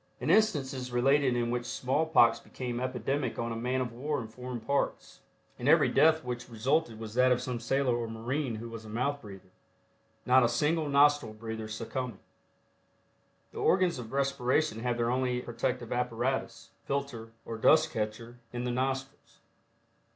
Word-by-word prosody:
An -, -, 0 dB
instance 165 Hz, -12 st, +3 dB
is 125 Hz, -1 st, -5 dB
related 135 Hz, +1 st, +3 dB
in 120 Hz, -1 st, 0 dB
which 120 Hz, 0 st, -2 dB
small 140 Hz, +5 st, 0 dB
pox 120 Hz, -7 st, +5 dB
became 120 Hz, -2 st, -5 dB
epidemic 130 Hz, +1 st, -2 dB
on 115 Hz, 0 st, -2 dB
a -, -, -3 dB
man 125 Hz, +3 st, -1 dB
of 120 Hz, -2 st, -3 dB
war 145 Hz, +5 st, -2 dB
in 115 Hz, -, -6 dB
foreign 125 Hz, +1 st, -6 dB
parts, 140 Hz, +5 st, -2 dB, 0.4 s
and -, -, 0 dB
every -, -, +6 dB
death 160 Hz, 0 st, +4 dB
which 125 Hz, 0 st, -5 dB
resulted 120 Hz, +2 st, 0 dB
was 110 Hz, -1 st, -7 dB
that 125 Hz, +1 st, +4 dB
of 125 Hz, -, +3 dB
some 125 Hz, -2 st, -4 dB
sailor 130 Hz, +1 st, +1 dB
or 120 Hz, -1 st, -2 dB
marine 120 Hz, +3 st, -3 dB
who 115 Hz, +2 st, -6 dB
was 115 Hz, -1 st, -8 dB
a 110 Hz, -, -11 dB
mouth 140 Hz, +6 st, -1 dB
breather, 95 Hz, -3 st, -12 dB, 0.7 s
not 130 Hz, +1 st, +6 dB
a 120 Hz, -, +3 dB
single 150 Hz, +5 st, +1 dB
nostril 145 Hz, -4 st, +4 dB
breather 110 Hz, 0 st, -6 dB
succumbing. 115 Hz, +1 st, -4 dB, 1.3 s
The -, -, -8 dB
organs 185 Hz, -6 st, +2 dB
of 115 Hz, -2 st, -8 dB
respiration 135 Hz, -2 st, +1 dB
have 120 Hz, 0 st, -1 dB
their 120 Hz, 0 st, +1 dB
only 125 Hz, -1 st, 0 dB
protective 120 Hz, 0 st, -3 dB
apparatus, 125 Hz, 0 st, -2 dB
filter, 130 Hz, -5 st, -4 dB
or 115 Hz, -1 st, -6 dB
dust 155 Hz, +7 st, +5 dB
catcher, 115 Hz, +2 st, -4 dB
in 120 Hz, 0 st, -4 dB
the 125 Hz, -, -1 dB
nostrils. 135 Hz, +2 st, -3 dB
125 Hz, 170 wpm, -30 LUFS, 115-135 Hz, 1.3 s, every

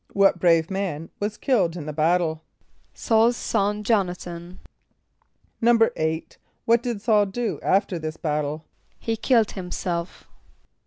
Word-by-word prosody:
= -, -, -24 dB
What 195 Hz, -2 st, +4 dB
brave 165 Hz, 0 st, +3 dB
man 180 Hz, -5 st, -3 dB
was 205 Hz, +1 st, -3 dB
killed 190 Hz, -, +1 dB
in 155 Hz, -, -6 dB
the 150 Hz, -, -5 dB
battle? 160 Hz, +1 st, +1 dB, 0.5 s
=S[a:]ul's 230 Hz, +1 st, +3 dB
son 205 Hz, +1 st, -1 dB
J[)o]n´a 195 Hz, -5 st, +1 dB
than.= 175 Hz, +1 st, -9 dB, 1.0 s
=8.= 225 Hz, -9 st, +1 dB, 0.3 s
What 230 Hz, 0 st, +4 dB
did 240 Hz, -3 st, -3 dB
S[a:]ul 210 Hz, -3 st, +3 dB
do 230 Hz, +3 st, -3 dB
after 190 Hz, -2 st, +1 dB
this 155 Hz, 0 st, -5 dB
battle? 150 Hz, 0 st, -2 dB, 0.3 s
=He 225 Hz, -, -2 dB
killed 225 Hz, -1 st, +2 dB
himself. 180 Hz, -2 st, -4 dB
185 Hz, 135 wpm, -24 LUFS, 165-220 Hz, 1.0 s, What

